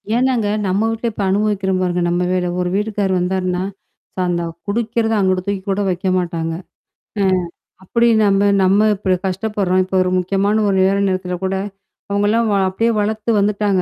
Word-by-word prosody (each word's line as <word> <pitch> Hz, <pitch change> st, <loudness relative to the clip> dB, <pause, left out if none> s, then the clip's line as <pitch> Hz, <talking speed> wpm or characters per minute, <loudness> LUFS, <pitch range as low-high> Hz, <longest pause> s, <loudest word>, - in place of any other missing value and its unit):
ஏனாங்க, 245 Hz, -4 st, +1 dB, 0.2 s
நம்ம 200 Hz, +4 st, +1 dB
வீட்ல 225 Hz, +1 st, -2 dB
இப்ப 205 Hz, -, -4 dB
அனுபவிக்கிற 200 Hz, -1 st, 0 dB
பாருங்க. 180 Hz, -1 st, 0 dB
நம்ம 175 Hz, +1 st, 0 dB
வேல 180 Hz, -1 st, 0 dB
ஒரு 180 Hz, -, -1 dB
வீட்டுக்கார் 205 Hz, -2 st, -1 dB
வந்தருன்னா, 180 Hz, 0 st, -1 dB, 0.5 s
ச -, -, -52 dB
அந்த 170 Hz, -1 st, -1 dB, 0.2 s
குடிக்கறத 225 Hz, +1 st, 0 dB
அங்குட்ட 185 Hz, -1 st, +1 dB
தூக்கி 200 Hz, -1 st, -1 dB
கூட 195 Hz, +1 st, 0 dB
வைக்க 180 Hz, +1 st, -2 dB
மாட்டாங்க. 170 Hz, -2 st, -2 dB, 0.7 s
அ -, -, +3 dB, 0.6 s
அப்படி 235 Hz, +5 st, +1 dB, 0.2 s
நம்ம 200 Hz, 0 st, +3 dB, 0.2 s
நம்ம 200 Hz, +3 st, +4 dB
இப்படி 190 Hz, -1 st, 0 dB
கஷ்டப்படுறோம். 190 Hz, -1 st, 0 dB
இப்ப 190 Hz, -, -8 dB
ஒரு 185 Hz, -, 0 dB
முக்கியமான 200 Hz, +4 st, +1 dB
ஒரு 195 Hz, -, +1 dB
நேர 195 Hz, +1 st, +2 dB
நேரத்தில 185 Hz, -1 st, -2 dB
கூட 190 Hz, 0 st, -1 dB, 0.6 s
அவங்கலாம் 210 Hz, +3 st, +2 dB
வ -, -, +2 dB
அப்படியே 225 Hz, +5 st, 0 dB
வளத்து 215 Hz, +2 st, -2 dB
வந்துட்டாங்க. 205 Hz, -1 st, +1 dB
195 Hz, 160 wpm, -18 LUFS, 185-210 Hz, 0.7 s, நம்ம